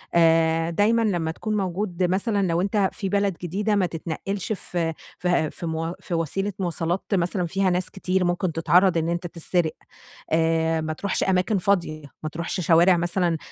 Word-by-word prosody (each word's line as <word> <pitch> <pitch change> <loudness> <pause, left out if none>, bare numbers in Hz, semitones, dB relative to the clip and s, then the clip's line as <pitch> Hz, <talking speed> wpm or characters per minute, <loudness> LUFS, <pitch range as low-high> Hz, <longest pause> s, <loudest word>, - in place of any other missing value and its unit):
آآ، 165 0 +4
دايمًا 210 +7 +2
لما 175 -7 0
تكون 215 +5 -3
موجود 185 -1 -2
مثلًا 195 +2 +1
لو 170 +1 +1
أنت 200 0 +1
في 195 -3 -3
بلد 200 -2 +1
جديدة 205 +5 0
ما 195 -2 +2
تتنقلش 175 +5 -3
في 170 -4 -3 0.3
في 175 -4 +1
في - - -8
م 165 +1 -2
في - - -7
وسيلة 195 +5 -1
مواصلات 175 0 -1
مثلًا 180 0 +1
فيها 190 +3 +1
ناس 180 0 0
كتير، 190 -1 -1
ممكن 175 0 0
تتعرض 170 +3 +3
إن 165 0 0
أنت 175 +1 -2
تسرق 170 0 -1 0.6
آآ، 160 0 +2
ما 155 0 -2
تروحش 200 +5 -1
أماكن 190 +2 +2
فاضية، 170 -5 0 0.2
ما 155 - -2
تروحش 170 +4 -3
شوارع 175 +2 +5
مثلًا 175 -1 0
175 Hz, 170 wpm, -24 LUFS, 165-195 Hz, 0.6 s, شوارع